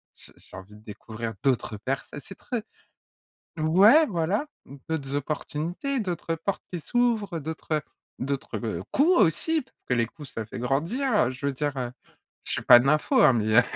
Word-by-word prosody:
J'ai - - -17
j'ai - - -14
envie 95 +3 -12
de 105 - -16
découvrir 110 +2 -7
d'autres 125 -5 0
perso 135 +6 -4
c'est 195 - -11
très 245 -4 -4 1.0
Ouais 200 - +6
voilà, 190 - 0 0.4
d'autres 140 -4 -3
opportunités, 160 - -3
d'autres 175 -4 -2
portes 185 +5 -3
qui 175 - -3
s'ouvrent, 215 - 0
d'autres, 160 +1 -4
heu, 150 - 0 0.4
d'autres, 135 +1 -3
heu, 90 -6 -3
coups 340 +6 +4
aussi, 305 - +2
parce 260 - -23
que 125 - +3
les 115 -1 +2
coups 145 +4 -12
ça 110 - -5
fait 110 - -8
grandir, 170 - -1 0.2
heu, 130 - -2
je 130 +2 -7
veux 140 - +1
dire, 145 +1 -2
heu, 125 -2 -3 0.5
je - - -2
suis - - -1
pas 120 - +9
nympho, 150 - +3
hein, 135 - +7
mais, 110 -1 +1
heu. - - +10
150 Hz, 185 wpm, -26 LUFS, 125-200 Hz, 1.0 s, heu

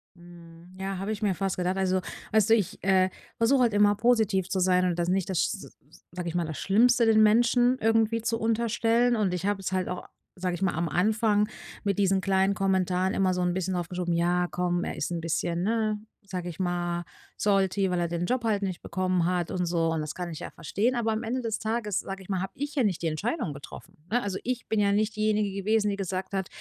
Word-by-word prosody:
Mhm, 170 -1 -15
ja, 195 0 -3
habe 195 +3 -3
ich 215 - -4
mir 205 -3 +2
fast 195 0 -2
gedacht. 180 +1 -1
Also, 185 -1 +1 0.3
weißt 220 0 +3
du, 225 - +7
ich, 205 -6 -2
äh, 190 0 +4 0.3
versuche 250 +3 +3
halt 235 -4 +3
immer 205 0 +4
positiv 215 -4 +2
zu 190 - 0
sein 180 0 +3
und 175 -1 0
das 170 - 0
nicht 185 0 0
das 185 - 0
sch - - +1
s - - -10 0.3
sage 180 0 -5
ich 170 - -4
mal 175 - +1
das 155 -1 -5
Schlimmste, 235 +4 +4
den 220 -1 +5
Menschen 240 +3 +4
irgendwie 225 0 +2
zu 230 0 -1
unterstellen. 230 +1 +2
Und 205 -5 0
ich 180 +1 -3
habe 205 -1 0
es - - -3
halt 185 -1 0
auch, 180 0 -5 0.3
sage 180 -1 -2
ich 175 - -9
mal 190 - +1
am 165 +1 -1
Anfang 210 +4 +2 0.4
mit 200 -2 0
diesen 195 -1 +3
kleinen 190 0 +2
Kommentaren 190 -1 +1
immer 190 -1 +2
so 180 - -1
'n 180 0 +1
bisschen 185 0 -2
aufgeschoben: 175 0 -2
„Ja, 175 +1 +1
komm, 175 0 -1
er - - -4
ist - - -2
'n 170 - -2
bisschen, 170 +1 -1
ne, 215 0 0 0.2
sage 180 -3 -5
ich 170 - -9
mal 175 -1 -1 0.3
salty, 195 -1 +1
weil 180 -1 0
er 170 - 0
den 170 +1 -2
Job 250 -1 0
halt 210 -3 +1
nicht 185 -3 -3
bekommen 185 -2 0
hat 175 -1 0
und 180 -1 -1
so“, 165 -1 +1
und 160 - -1
das 150 0 -5
kann 180 -1 -4
ich 160 - -7
ja - - -6
verstehen. 225 +10 -1
Aber 225 -2 0
am 220 +2 -2
Ende 250 +3 -2
des 225 -2 -2
Tages, 220 -3 -1
sage 195 0 -6
ich - - -18
mal, 190 -2 -1
habe 190 - -5
ich 290 +2 -5
ja 270 - +2
nicht 195 -6 0
die 170 - 0
Entscheidung 165 - -2
getroffen, 140 0 -11
ne? 245 +3 +1
Also, 195 -2 -2
ich 250 -1 -3
bin 220 - 0
ja 200 -1 +3
nicht 215 +1 0
diejenige 215 -1 +1
gewesen, 215 +1 +2
die 200 - -1
gesagt 190 0 -4
hat: 190 -2 -1
195 Hz, 240 wpm, -27 LUFS, 180-220 Hz, 0.4 s, du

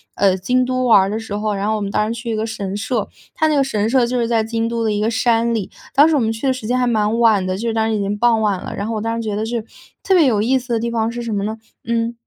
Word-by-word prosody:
呃， 195 -2 +3
京 250 +7 +1
都 255 0 -1
玩 225 -5 +7
儿 190 - -2
的 210 - -2
时 220 -2 -6
候， 210 0 -1
然 195 +1 -2
后 220 - +1
我 - - -4
们 200 - -2
当 210 +1 0
时 230 - -7
去 235 - -6
一 - - -1
个 215 +1 -1
神 200 -3 -4
社， 220 +4 -2 0.3
它 315 - +1
那 305 - +1
个 280 - +3
神 220 -5 -1
社 250 0 +3
就 250 +1 -1
是 235 - 0
在 230 -1 +1
京 225 +1 -2
都 230 0 -2
的 220 - +1
一 210 - -1
个 215 - +1
山 235 0 +1
里。 215 -5 -3 0.2
当 290 +3 +6
时 320 - +2
我 - - +3
们 225 -2 0
去 225 +4 -6
的 - - +4
时 255 -4 -7
间 250 +2 +1
还 250 - +2
蛮 220 -2 +1
晚 220 -5 +4
的， 185 0 -1
就 225 - -5
是 - - -2
当 220 0 +1
时 220 - 0
已 210 - -1
经 200 +1 -1
傍 230 0 +3
晚 200 -4 0
了， - - -6
然 200 - -3
后 225 - -3
我 215 - -2
当 225 +1 -2
时 230 - -3
觉 210 -1 -2
得 215 - -2
是， 230 0 -3 0.4
特 390 - +2
别 345 -5 +5
有 220 -6 +2
意 260 +4 +2
思 245 -1 -5
的 230 - +1
地 235 0 -2
方 225 -1 0
是 240 +1 -5
什 235 -1 -4
么 200 -2 -1
呢？ 220 +1 -4 0.3
嗯 230 0 0
225 Hz, 370 characters per minute, -19 LUFS, 210-240 Hz, 0.4 s, 玩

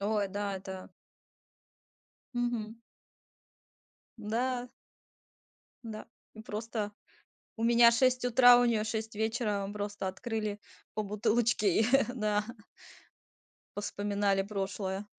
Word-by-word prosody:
Ой, 205 -1 0
да, 200 0 -3
это 190 -1 -8 1.4
Мгм. 240 -2 -2 1.4
М-да. 245 +3 -2 1.1
Да. 220 -2 -7 0.3
Мы 220 - -10
просто, 215 -1 -4 0.7
у 225 - -3
меня 235 0 +7
6 255 +1 +2
утра, 245 0 +7
у 245 - +4
неё 225 -3 +2
6 220 0 -4
вечера. 220 -2 -1
Мы 205 - -6
просто 205 -1 -4
открыли 215 +1 -3 0.3
по 215 - -2
бутылочке 215 -1 +2
и - - +3 0.3
да 210 -3 0 1.3
повспоминали 205 -1 0
прошлое. 195 0 -3
215 Hz, 100 wpm, -31 LUFS, 205-235 Hz, 1.4 s, меня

